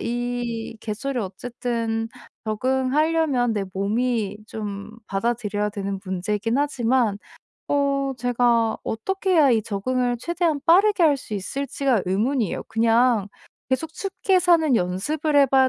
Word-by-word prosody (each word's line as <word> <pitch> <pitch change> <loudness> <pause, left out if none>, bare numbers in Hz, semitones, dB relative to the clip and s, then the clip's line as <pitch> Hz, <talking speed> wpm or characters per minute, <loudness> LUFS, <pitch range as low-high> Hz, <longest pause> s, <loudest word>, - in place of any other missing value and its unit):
이 240 -1 -3
계절을 245 +5 -3
어쨌든 225 +2 -3 0.4
적응하려면 260 +3 +1
내 205 -2 -1
몸이 210 +1 0
좀 205 -1 -6 0.2
받아들여야 210 0 -1
되는 200 -1 -4
문제이긴 205 +6 -1
하지만 245 -6 +1 0.5
어 275 -1 +1
제가 240 -2 +2
어떻게 385 - -2
해야 305 -6 +5
이 225 -3 +3
적응을 245 +4 -1
최대한 335 +1 0
빠르게 390 +3 +5
할 300 -3 +5
수 220 - -7
있을지가 265 +2 -1
의문이에요. 220 +4 0
그냥 225 -1 +3 0.4
계속 310 +5 -1
춥게 385 0 0
사는 330 -6 +4
연습을 290 - -1
해 280 - +7
봐야 265 0 +4
245 Hz, 280 characters per minute, -23 LUFS, 215-280 Hz, 0.5 s, 해